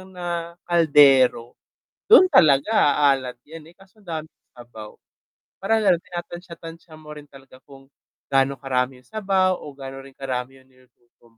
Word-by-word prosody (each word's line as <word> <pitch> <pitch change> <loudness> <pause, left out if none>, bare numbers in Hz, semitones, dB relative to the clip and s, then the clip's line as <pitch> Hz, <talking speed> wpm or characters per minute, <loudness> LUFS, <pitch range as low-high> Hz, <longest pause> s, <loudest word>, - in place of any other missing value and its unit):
na 170 -1 -6
kaldero, 140 -8 +3 0.6
dun 375 -5 +7
talaga 140 - +3
a-alat 135 -6 +1
yan, 160 0 -12
eh, - - -37
kaso 195 +2 -23
daming 160 -3 -6 0.2
sabaw, 120 -3 -13 0.6
parang 220 +3 0
ganun 185 -4 +1
tinatantya 175 -1 -9
tantya 165 0 -13
mo 150 -1 -11
rin 150 - -11
talaga, 135 -1 -17
kung 135 -1 -17 0.4
gaano 135 0 0
karami 130 -1 -3
yung 125 - -29
sabaw 190 -3 0
o 150 - -11
gaano 135 -1 -10
rin 135 - -15
karami 130 0 -6
yung 130 - -27
niluluto 125 -2 -30
145 Hz, 150 wpm, -22 LUFS, 135-175 Hz, 0.6 s, dun